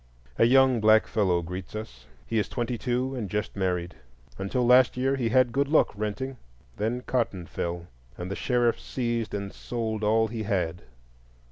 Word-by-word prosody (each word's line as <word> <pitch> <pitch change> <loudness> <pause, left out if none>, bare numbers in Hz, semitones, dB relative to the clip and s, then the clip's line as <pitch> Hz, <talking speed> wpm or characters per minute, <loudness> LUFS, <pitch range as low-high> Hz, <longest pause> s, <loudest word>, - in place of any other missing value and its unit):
A - - +6
young 130 0 +5
black 110 0 +6
fellow 90 -5 +1
greets 90 +3 -7
us. 65 - -8 0.2
He 115 - 0
is 105 - -1
twenty 120 0 -2
two, 125 +2 -1
and 115 -7 -4
just 105 +3 -3
married. 90 -3 -1 0.5
Until 110 +6 0
last 125 +1 +5
year 135 +2 +1
he 120 -4 -1
had 130 0 +4
good 140 +3 +1
luck 155 +2 +3
renting; 115 +6 -4 0.4
then 115 +4 -1
cotton 115 -9 -1
fell, 85 0 -4 0.3
and 90 +2 -5
the - - -2
sheriff 120 -1 +1
seized 120 -4 -2
and 100 -1 -5
sold 110 -3 -4
all 110 +1 +3
he 110 0 -5
had. 90 -5 -1
110 Hz, 170 wpm, -27 LUFS, 100-125 Hz, 0.5 s, A